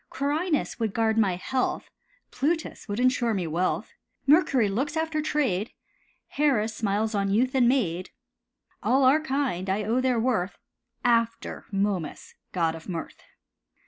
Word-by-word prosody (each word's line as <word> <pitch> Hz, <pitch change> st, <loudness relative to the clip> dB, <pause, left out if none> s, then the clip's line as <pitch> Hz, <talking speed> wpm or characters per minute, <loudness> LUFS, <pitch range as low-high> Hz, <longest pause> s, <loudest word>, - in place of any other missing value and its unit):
Quirinus 300 Hz, +3 st, -1 dB
would 220 Hz, -3 st, -1 dB
guard 225 Hz, -1 st, +2 dB
my 195 Hz, -5 st, +3 dB
health, 255 Hz, +8 st, -2 dB, 0.4 s
Plutus 320 Hz, +4 st, -2 dB
would 205 Hz, +1 st, -3 dB
insure 245 Hz, -3 st, +2 dB
me 185 Hz, -3 st, -1 dB
wealth; 170 Hz, +3 st, -1 dB, 0.3 s
Mercury 280 Hz, -, +4 dB
looks 270 Hz, +10 st, -1 dB
after 320 Hz, -1 st, 0 dB
trade, 250 Hz, -10 st, 0 dB, 0.5 s
Hera 275 Hz, -7 st, +2 dB
smiles 215 Hz, 0 st, -1 dB
on 200 Hz, -1 st, 0 dB
youth 245 Hz, +6 st, +2 dB
and 250 Hz, -3 st, +4 dB
maid. 185 Hz, -9 st, 0 dB, 0.7 s
All 265 Hz, +2 st, +3 dB
are 270 Hz, +4 st, +5 dB
kind, 265 Hz, -, -1 dB
I 200 Hz, +3 st, 0 dB
own 230 Hz, +5 st, +1 dB
their 255 Hz, -2 st, +2 dB
worth, 220 Hz, -6 st, 0 dB, 0.5 s
After 230 Hz, -1 st, 0 dB
Momus, 195 Hz, -5 st, -2 dB, 0.2 s
god 165 Hz, -3 st, +1 dB
of 165 Hz, +3 st, -10 dB
mirth. 170 Hz, -3 st, -6 dB
230 Hz, 140 wpm, -26 LUFS, 195-270 Hz, 0.7 s, are